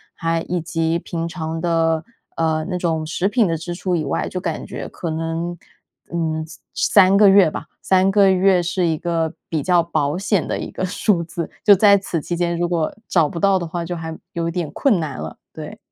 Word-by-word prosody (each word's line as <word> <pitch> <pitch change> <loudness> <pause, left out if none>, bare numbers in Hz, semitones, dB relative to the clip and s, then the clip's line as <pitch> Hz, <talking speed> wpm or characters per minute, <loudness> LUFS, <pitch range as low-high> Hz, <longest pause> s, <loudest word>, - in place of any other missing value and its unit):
还 165 0 -1
以 180 0 0
及 165 0 -1
平 170 -1 -4
常 160 -1 -4
的， 165 -1 +1 0.3
呃， 160 -1 0
那 180 - -1
种 165 -3 -1
食 175 +4 -1
品 220 0 +2
的 165 - 0
支 175 +2 -5
出 180 0 -1
以 160 - -1
外， 140 - -1
就 185 - -4
感 165 -4 -3
觉 - - -6
可 170 - -5
能， 165 +2 -3 0.6
嗯， 160 -2 -1
3 160 - -12 0.6
3 200 - +5
个 205 -1 +7
月 195 -3 +6
吧， - - -7
3 190 0 +3
个 200 -1 +5
月 190 -1 +4
是 180 +1 -1
一 160 -1 0
个 165 -1 -1 0.2
比 155 -3 -1
较 180 -2 +4
保 155 -2 -1
险 195 -1 0
的 - - -2
一 - - -5
个 185 - -3
数 185 -1 +1
字。 170 0 -5
就 205 - +8
在 200 +1 +6
此 185 -4 -3
期 175 - -3
间， 170 0 -1
如 175 - +1
果 165 -3 0
找 165 -4 +3
不 170 - -5
到 195 +2 +4
的 175 - -3
话， 170 +1 -4
就 175 +1 -4
还 160 -1 -6 0.2
有 170 -1 -2
一 - - -1
点 170 -3 -3
困 220 - +2
难 150 -5 -4
了， - - -7 0.2
对。 - - -8
170 Hz, 225 characters per minute, -20 LUFS, 160-185 Hz, 0.6 s, 就